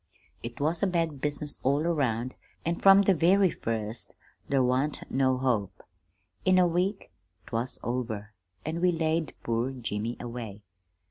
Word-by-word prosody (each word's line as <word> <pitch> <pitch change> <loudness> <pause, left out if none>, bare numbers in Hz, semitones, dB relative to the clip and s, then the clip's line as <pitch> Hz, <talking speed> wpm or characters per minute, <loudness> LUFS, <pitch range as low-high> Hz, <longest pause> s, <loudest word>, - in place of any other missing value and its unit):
"It 120 0 -7
was 160 +3 +1
a 200 - +3
bad 165 -6 -1
business 150 0 -1
all 140 +3 +2
around, 130 -7 0 0.3
an' 170 +1 0
from 195 0 +7
the 195 - +4
very 185 +2 +4
first 110 0 -4 0.4
there 135 -2 +3
wan't 130 +4 +1
no 130 -1 +2
hope. 120 -7 -1 0.6
In 185 0 +4
a 180 - +6
week 185 +4 -1 0.3
'twas 120 +3 -2
over, 115 -4 -3 0.3
an' 160 +2 -2
we 180 0 +4
laid 160 -1 0
poor 115 +2 0
Jimmy 115 -3 -3
away. 115 -4 -7
135 Hz, 145 wpm, -28 LUFS, 120-170 Hz, 0.6 s, from